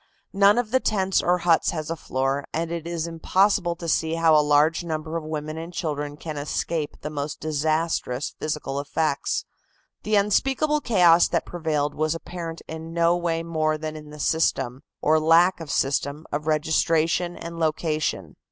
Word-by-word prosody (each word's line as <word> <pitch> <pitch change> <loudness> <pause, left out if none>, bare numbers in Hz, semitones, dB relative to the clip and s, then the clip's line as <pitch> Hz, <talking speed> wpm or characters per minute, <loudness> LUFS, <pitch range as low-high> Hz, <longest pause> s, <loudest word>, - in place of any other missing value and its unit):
None 200 +2 +5
of 240 -3 -1
the 260 - +4
tents 195 -5 +1
or 180 +1 +2
huts 170 -2 +3
has 155 -1 -3
a - - -1
floor, 135 -1 -2
and 165 +1 -2
it 170 -1 -4
is 170 -1 -2
impossible 175 +2 +1
to 170 0 -7
see 160 0 +1
how 165 -1 +4
a 150 - +6
large 150 +3 +3
number 160 -1 -4
of 165 - -2
women 155 0 -4
and 165 +2 -7
children 145 -4 -3
can 155 -1 -6
escape 150 +1 -3
the 150 - -5
most 145 -1 -4
disastrous 155 -3 -1
physical 150 -3 -3
effects. 145 0 -1 0.6
The 215 0 0
unspeakable 270 +9 +2
chaos 175 -8 +5
that - - -1
prevailed 155 -4 -1
was 155 +1 0
apparent 165 0 -7
in 160 +1 -7
no 170 0 +3
way 170 -1 -1
more 155 -2 0
than 155 0 -5
in 150 -1 -10
the 150 0 -11
system, 140 -5 0 0.2
or 155 +1 +4
lack 165 +4 +4
of 165 -3 -8
system, 140 +3 -1
of 150 +1 -3
registration 160 +2 +1
and 170 0 -7
location. 155 -1 -1
160 Hz, 170 wpm, -24 LUFS, 150-170 Hz, 0.6 s, a